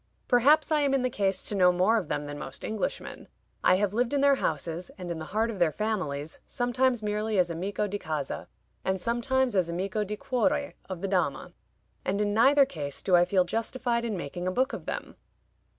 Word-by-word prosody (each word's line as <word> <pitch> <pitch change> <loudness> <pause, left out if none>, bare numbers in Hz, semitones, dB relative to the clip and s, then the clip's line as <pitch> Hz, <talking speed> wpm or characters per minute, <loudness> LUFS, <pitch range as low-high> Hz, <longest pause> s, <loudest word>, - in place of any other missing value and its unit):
Perhaps 290 +6 +4
I 305 - +4
am 275 -1 +2
in 265 - +1
the 255 - 0
case 195 -3 0
to - - -3
know 180 -2 +5
more 185 +6 +3
of 180 - -6
them 145 0 -2
than 145 0 -6
most 135 - -6
Englishmen. 220 -1 -4 0.4
I - - +6
have 200 +1 0
lived 245 +4 +1
in 280 - +2
their 280 0 +6
houses, 165 +3 -2
and 180 -2 -5
in 165 - -4
the 160 - -6
heart 220 +6 0
of 205 - -7
their 170 -3 +3
families, 160 -8 -3
sometimes 245 -1 +1
merely 210 0 -1
as 175 -2 +3
Amico 190 +5 -2
di 205 0 -3
Casa, 155 -5 -4 0.4
and 190 0 0
sometimes 240 +3 0
as 180 -3 +2
Amico 190 +5 -1
di 210 +1 -5
Cuore 280 +3 0 0.2
of 185 -2 -5
the 195 - -1
Dama, 180 -8 -1 0.5
and 200 +2 -1
in 205 -1 +1
neither 275 +6 +6
case 145 - -5
do 185 - +4
I 175 0 +6
feel 185 -1 +3
justified 235 +4 -1
in 220 -4 -2
making 175 +3 -5
a - - +1
book 260 +7 +1
of - - -7
them. - - -5
205 Hz, 215 wpm, -28 LUFS, 175-245 Hz, 0.5 s, I